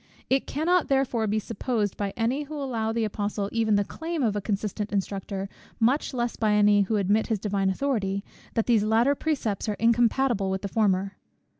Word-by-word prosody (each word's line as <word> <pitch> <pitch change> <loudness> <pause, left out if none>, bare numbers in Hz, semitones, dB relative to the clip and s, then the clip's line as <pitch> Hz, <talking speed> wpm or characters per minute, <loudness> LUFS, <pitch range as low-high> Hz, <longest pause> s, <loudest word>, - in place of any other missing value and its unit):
It 270 0 +2
cannot 340 +4 +1
therefore 260 -5 +1
be 210 +1 0
supposed 215 -1 -2
by 200 -1 -2
any 240 +5 0
who 300 +1 -7
allow 255 -6 -2
to 225 - -1
the 230 - +1
Apostle 205 -1 -2
even 225 -2 +2
the 205 - +3
claim 320 - -4
of 215 -4 +1
a 205 - -1
consistent 205 +1 -3
instructor, 195 0 -3 0.3
much 250 +6 +2
less 240 -3 -2
by 215 -2 +1
any 205 0 +5
who 200 +3 0
admit 205 +2 +2
his 225 - 0
Divine 195 -1 0
authority, 200 -4 -1 0.3
that 225 - +1
these 230 -4 +3
latter 225 +6 +3
precepts 255 -9 -2
are 210 - -1
incompatible 235 -2 +2
with 190 +1 -2
the - - -1
former. 195 -2 0
220 Hz, 190 wpm, -26 LUFS, 200-245 Hz, 0.3 s, any